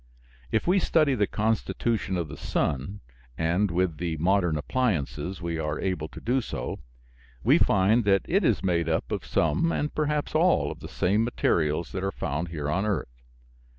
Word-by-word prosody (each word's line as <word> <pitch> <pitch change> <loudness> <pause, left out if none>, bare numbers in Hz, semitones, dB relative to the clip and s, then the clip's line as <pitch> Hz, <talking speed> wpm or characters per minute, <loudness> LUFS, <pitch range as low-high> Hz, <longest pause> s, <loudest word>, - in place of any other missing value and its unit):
If 110 - +1
we 185 +3 +4
study 155 -5 +3
the 105 -5 +1
constitution 110 -3 -1
of 85 -3 -2
the - - -8
sun 70 +9 -2 0.4
(and 85 +5 +1
with 85 -2 0
the 85 -1 -2
modern 90 -1 +2
appliances 95 - -2
we 85 -1 -2
are 75 -1 -2
able 90 -5 -2
to - - -11
do 130 +3 +1
so), - - -5 0.6
we - - +5
find 100 +5 +3
that 100 -1 +3
it 195 +4 +1
is 105 - +2
made 85 -3 +1
up 80 -6 -1
of - - -2
some 80 - +1
and 150 -2 -2
perhaps 150 -1 -1
all 170 +3 +3
of - - -9
the - - -9
same 105 +5 +1
materials 85 -8 0
that 95 -1 -4
are 95 - 0
found 80 0 -3
here 75 -3 -4
on 90 +7 0
earth. 75 - -3
95 Hz, 180 wpm, -26 LUFS, 80-115 Hz, 0.6 s, we